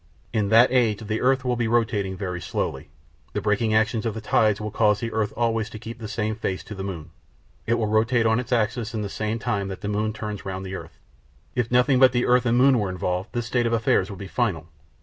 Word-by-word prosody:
In 105 -3 +1
that 115 +4 +6
age 115 -4 +2
the 110 +1 -2
earth 130 +1 +2
will 125 -1 +1
be 120 -1 0
rotating 105 -5 0
very 90 -3 -4
slowly. 70 - -3 0.4
The - - -1
braking 110 +1 +1
action 110 0 +2
of 110 - -3
the - - -4
tides 105 -1 +2
will 105 0 -4
cause 105 -1 +2
the 115 -1 -3
earth 110 -1 -1
always 115 -2 0
to 115 - -8
keep 115 +2 -8
the 110 - -6
same 105 0 -2
face 95 -4 -3
to - - -9
the 95 -1 -6
moon; 85 -5 -6 0.6
it 115 - +3
will 115 -2 0
rotate 115 +3 +2
on 110 +1 +3
its 125 - -6
axis 115 0 0
in 105 - -2
the 100 - -4
same 110 +2 -2
time 100 -3 -2
that 95 -1 -7
the - - -4
moon 105 +1 0
turns 105 -2 -6
round 95 0 -5
the 95 - -6
earth. 85 -3 -8 0.6
If 120 -2 -1
nothing 125 +2 +3
but 130 -1 +6
the 120 0 +1
earth 125 0 +3
and 120 +1 +3
moon 130 -1 +5
were 100 -3 -1
involved 90 +2 -2
this 120 -2 -2
state 120 0 +1
of 115 - -1
affairs 110 -4 +2
would 100 - -7
be 100 - -7
final. 95 -8 -1
110 Hz, 250 wpm, -24 LUFS, 100-120 Hz, 0.6 s, that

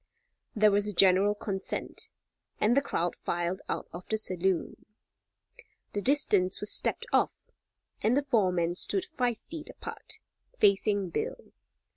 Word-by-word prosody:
There 215 -1 +5
was 205 +1 +1
a 210 - -2
general 195 +2 +5
consent, 195 -2 -4 0.5
and 220 +3 +3
the 280 - +4
crowd 175 -10 -2
filed 175 +2 -2
out - - -3
of 175 - -7
the 220 - +1
saloon. 185 -3 -1 1.1
The 205 - -1
distance 205 -8 +3
was 210 - -2
stepped 465 - +2
off, - - +2 0.6
and 235 +5 +2
the 285 - +2
four 225 -9 +2
men 170 -1 0
stood 370 - +1
five 250 -9 -1
feet 315 +5 -9
apart, - - -9 0.4
facing 200 - +2
Bill. - - -4
205 Hz, 140 wpm, -29 LUFS, 185-240 Hz, 1.1 s, There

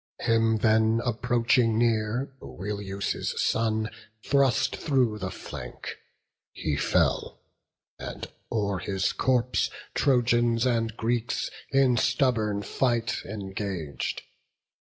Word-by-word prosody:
Him 115 -1 +3
then, 110 +1 +3
approaching 120 -1 +2
near, 115 +3 +1
Oileus' 100 0 -3
son 110 -1 +1 0.3
Thrust 135 -1 +3
through 125 -7 +1
the 95 -2 -3
flank: - - -7 0.6
he 75 - -2
fell, - - +1 0.6
and - - -6 0.3
o'er 100 -4 0
his 95 0 -1
corpse 125 -1 +1 0.2
Trojans 120 -3 +3
and 115 -2 0
Greeks 120 +1 -1 0.2
in 135 -3 +4
stubborn 115 -5 +1
fight 120 +1 0
engag'd. 95 - -4
115 Hz, 90 wpm, -27 LUFS, 105-125 Hz, 0.6 s, in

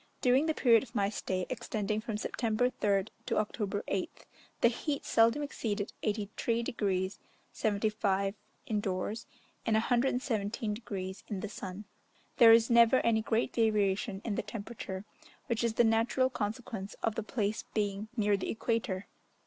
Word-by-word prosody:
During 260 +5 +3
the 315 - +1
period 230 -4 +5
of 230 - -12
my 200 -1 +2
stay, 185 -3 -2
extending 215 0 -2
from 220 -2 -3
September 230 +3 0
3rd 200 -4 +1 0.2
to - - 0
October 210 -1 -1
8th, 190 -2 -3 0.4
the - - +7
heat 280 +4 -2
seldom 230 +6 +4
exceeded 215 -7 -3
83 215 +2 -1
degrees 190 -4 -1 0.3
75' 200 -2 0 0.3
indoors, 205 +1 -2 0.4
and 220 - +1
117 230 -3 0
degrees 195 -4 -5
in 195 -3 -4
the 210 - -4
sun. 195 0 -7 0.5
There 230 -2 +9
is 230 0 +6
never 235 +1 +6
any 225 -1 +2
great 225 +1 0
variation 205 -2 +1
in 225 - -1
the - - 0
temperature, 205 -2 -6 0.4
which 235 0 -1
is 230 -1 0
the 240 - +5
natural 235 +3 +2
consequence 215 -3 -4
of 225 - +1
the 225 - -2
place 215 -1 -1
being 205 -1 -1
near 205 -2 +3
the 195 - -3
equator. 220 -4 -1
215 Hz, 150 wpm, -31 LUFS, 200-230 Hz, 0.5 s, There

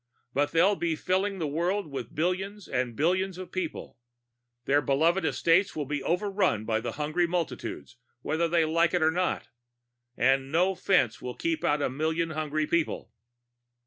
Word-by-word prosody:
But 145 +1 +1
they'll 180 +5 +4
be 170 -3 -1
filling 190 +4 0
the 165 - -2
world 175 +7 0
with 135 -6 -7
billions 190 +5 -2
and 125 -2 -2
billions 185 - +1
of 185 -1 -8
people. 175 -7 -5 0.7
Their 145 +1 +3
beloved 160 +7 +2
estates 165 +7 +2
will 150 - -2
be 145 +1 -3
overrun 180 - 0
by 110 -1 +1
the 115 0 -4
hungry 155 +4 0
multitudes, 175 -1 -4 0.3
whether 165 +2 0
they 165 -1 +2
like 165 +2 +2
it 175 - +2
or 160 - +4
not. 180 +2 -1 0.7
And 135 +2 +2
no 180 +4 +3
fence 175 - +1
will 125 -1 -5
keep 330 -1 -2
out 145 0 +2
a - - +1
million 160 +4 -1
hungry 155 0 -1
people." 165 +1 -1
165 Hz, 165 wpm, -28 LUFS, 145-185 Hz, 0.7 s, they'll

